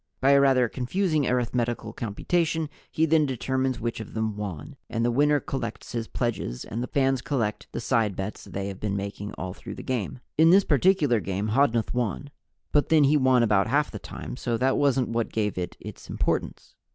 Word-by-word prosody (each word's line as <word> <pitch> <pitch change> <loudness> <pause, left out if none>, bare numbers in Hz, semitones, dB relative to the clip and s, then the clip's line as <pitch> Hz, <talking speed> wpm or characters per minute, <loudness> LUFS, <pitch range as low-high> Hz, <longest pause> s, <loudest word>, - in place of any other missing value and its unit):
By 135 +2 +4
a 140 0 +6
rather 130 -3 +4
confusing 150 - 0
arithmetical 120 -1 -1
computation 160 - -1 0.2
he 160 - +2
then 160 -1 +3
determines 130 0 -1
which 115 0 -3
of 110 - -8
them 110 -1 -1
won, 100 - -6
and 115 0 0
the 120 - +2
winner 145 +4 +3
collects 135 0 -5
his 115 -2 -3
pledges 115 - -3
and 115 - -4
the 125 - -3
fans 135 -2 +1
collect 115 -8 -2
the - - -4
side 115 -5 +1
bets 95 +3 -5
they 100 0 -4
have 95 - -8
been 100 -2 -2
making 100 +1 -5
all 95 -1 -5
through - - -9
the - - -8
game. 125 -2 -3 0.2
In 160 +1 +7
this 195 +3 +7
particular 150 - +3
game 100 +2 -2
Hodnuth 115 -1 +2
won. 125 +4 -2 0.4
But 145 - +2
then 155 -2 +5
he 145 +2 +4
won 130 -3 +4
about 105 -3 +3
half 145 +5 +1
the - - -6
time, - - -8
so 120 -3 -1
that 130 +3 +2
wasn't 135 -3 +2
what 115 0 -1
gave 105 -2 -1
it 90 -1 -4
its - - -10
importance. - - -2
125 Hz, 200 wpm, -26 LUFS, 110-140 Hz, 0.4 s, In